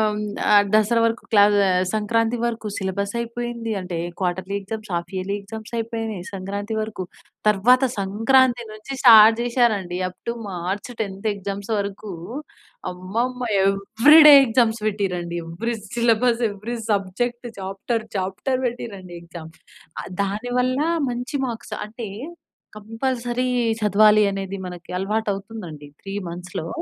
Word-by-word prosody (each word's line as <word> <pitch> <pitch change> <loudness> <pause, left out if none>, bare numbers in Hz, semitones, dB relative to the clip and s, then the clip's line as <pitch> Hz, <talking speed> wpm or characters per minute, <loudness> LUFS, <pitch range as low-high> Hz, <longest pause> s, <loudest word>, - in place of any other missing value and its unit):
హ్మ్, 210 -1 +1 0.5
దసరా 215 +2 +4
వరకు 230 +1 0
క్లా 205 -2 +7 0.2
ఆహ్, 185 0 +2
సంక్రాంతి 225 +2 +1
వరకు 230 -2 -2
సిలబస్ 200 +2 -3
అయిపోయింది. 235 0 -4
అంటే 180 -2 -5 0.2
quarterly 185 +1 -2
exams, 215 +1 -7
of 170 - -9
yearly 190 +2 -2
exams 220 +3 -9
అయిపోయినాయి 225 -4 -4
సంక్రాంతి 200 +3 -4
వరకు. 215 -3 -4 0.5
తరువాత 245 +6 +4 0.2
సంక్రాంతి 240 +5 +3
నుంచి 215 +5 -9
స్టార్ట్ 225 -2 +9
చేసారు 240 -2 +3
అండి 180 -2 -6
అప్ 180 - -15
టు 235 - 0 0.2
మార్చ్ 185 +5 -4
10థ్ 200 0 -4
ఎగ్జామ్స్ 200 +1 -6
వరకు. 200 0 -5 0.8
అమ్మమ్మ! 225 +8 -3 0.2
Every 220 +10 +5
day 295 - +11
exams 230 -1 +2
పెట్టిరండి. 180 -5 -2
Every 225 +9 -3 0.2
syllabus, 235 0 +2
every 210 +4 -5
subject, 240 +5 -1
chapter 195 +4 -3
chapter 200 +8 -2
పెట్టిరండి 200 -7 -6
exam. 170 -1 -10 0.5
ఆ - - -7 0.2
దాని 210 +5 -3
వల్ల 255 +1 0 0.3
మంచి 245 +4 -4
మార్క్స్ 225 -3 -6
అంటే 225 0 -7 0.7
కంపల్సరీ 240 +3 -2 0.3
చదవాలి 210 +1 +5
అనేది 195 0 -4
మనకి 180 -1 -10
అలవాటు 215 +3 -1
అవుతుంది 215 +1 -9
అండి. 145 -1 -11 0.2
3 195 - -7 0.2
మంత్స్‌లో 175 -1 -6
215 Hz, 130 wpm, -22 LUFS, 195-235 Hz, 0.8 s, day